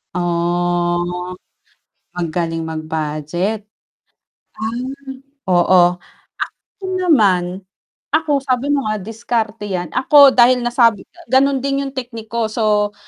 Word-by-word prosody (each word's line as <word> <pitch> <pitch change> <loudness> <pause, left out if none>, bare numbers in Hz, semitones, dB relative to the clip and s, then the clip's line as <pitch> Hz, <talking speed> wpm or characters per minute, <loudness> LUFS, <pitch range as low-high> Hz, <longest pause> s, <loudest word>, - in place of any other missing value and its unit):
Oh 175 +1 -1 0.8
magaling 165 -1 -2
mag-budget. 160 +5 -3 0.9
Ah. 220 +2 -4 0.7
Oo 180 +1 +5 1.0
ako - - -4
naman, 195 - +2 0.5
ako 310 -3 +2
sabi 255 +1 0
mo 280 -4 +1
nga 215 -2 -2
diskarte 225 0 -3
'yan, 180 -4 -3
ako 280 - +6
dahil 250 0 +4
nasabi 240 -3 +3 0.2
ganon 270 0 +3
din 275 +1 -1
yung 270 - -6
technique 230 -3 -6
ko 230 -1 -1
so 210 -2 0
210 Hz, 100 wpm, -18 LUFS, 175-245 Hz, 1.0 s, ako